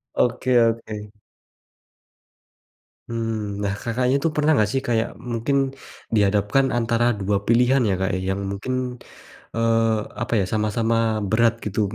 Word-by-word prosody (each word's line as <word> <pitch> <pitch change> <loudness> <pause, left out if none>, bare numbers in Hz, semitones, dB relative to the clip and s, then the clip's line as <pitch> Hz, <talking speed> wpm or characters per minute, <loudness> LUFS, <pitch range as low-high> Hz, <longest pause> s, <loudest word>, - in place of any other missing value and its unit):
Oke 125 +1 +2
oke. 110 -2 -1 2.0
Hmm, 110 -3 -3
nah 100 - 0
Kakaknya 125 +3 +1
tuh 165 - +2
pernah 150 +1 +3
nggak 105 -4 +2
sih, 135 - 0
kayak 115 -1 +1 0.2
mungkin 115 +5 0 0.6
dihadapkan 105 +5 +3
antara 115 0 +1
dua 100 +1 +1
pilihan 125 +3 +4
ya, - - +2
Kak, 95 - 0 0.2
yang 95 +1 -1
mungkin, 100 +6 -4 0.8
eee, 115 -1 +2 0.2
apa 120 - -5
ya, - - +1
sama-sama 110 +2 0 0.4
berat 115 +1 +3
gitu, 105 +1 -2
115 Hz, 125 wpm, -23 LUFS, 105-120 Hz, 2.0 s, pilihan